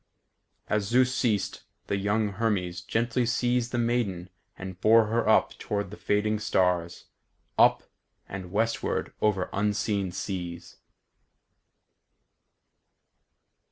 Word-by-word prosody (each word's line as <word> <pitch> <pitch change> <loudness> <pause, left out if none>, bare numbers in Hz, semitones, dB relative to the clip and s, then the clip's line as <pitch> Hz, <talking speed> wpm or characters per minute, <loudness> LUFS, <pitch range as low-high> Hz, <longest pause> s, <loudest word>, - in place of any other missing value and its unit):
As 105 -1 0
Zeus 125 +3 +3
ceased, 105 -7 0 0.2
the - - -1
young 105 +2 +1
Hermes 95 -4 -1
gently 115 +5 0
seized 120 0 0
the 120 - -1
maiden 115 -7 -1 0.3
and 95 -1 -8
bore 110 +1 +6
her 115 +2 0
up - - +4
toward 100 -2 -3
the - - -7
fading 105 +1 0
stars; 90 -4 0 0.5
up, - - +5 0.4
and 95 -2 -7
westward 115 +3 -1
over 100 -4 +1
unseen 100 -1 0
seas. 90 -2 -5
105 Hz, 105 wpm, -27 LUFS, 95-115 Hz, 0.5 s, bore